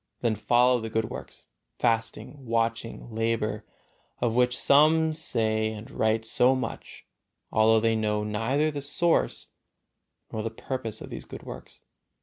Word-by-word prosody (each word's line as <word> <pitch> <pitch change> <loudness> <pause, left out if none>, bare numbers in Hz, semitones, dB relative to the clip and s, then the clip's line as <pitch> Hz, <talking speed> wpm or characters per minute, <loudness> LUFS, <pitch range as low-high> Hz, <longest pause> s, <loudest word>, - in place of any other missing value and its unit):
Then 115 -2 +2
follow 120 +4 +3
the 115 0 -5
good 110 0 -1
works, - - -9 0.3
fasting, 115 +5 -1
watching, 115 0 -2
labor, 110 -1 -1 0.5
of 120 -2 0
which 125 +1 +2
some 155 +3 +4
say 110 -8 0
and 110 +5 -9
write 110 -2 0
so 125 +3 +3
much, 130 - -6 0.5
although 110 +1 +4
they 115 0 +2
know 105 -1 0
neither 115 +9 0
the 145 -1 -5
source 165 +4 0 0.8
nor 110 - -3
the 115 - -2
purpose 115 0 -5
of - - -9
these - - -7
good - - -10
works. - - -10
115 Hz, 140 wpm, -27 LUFS, 110-130 Hz, 0.8 s, some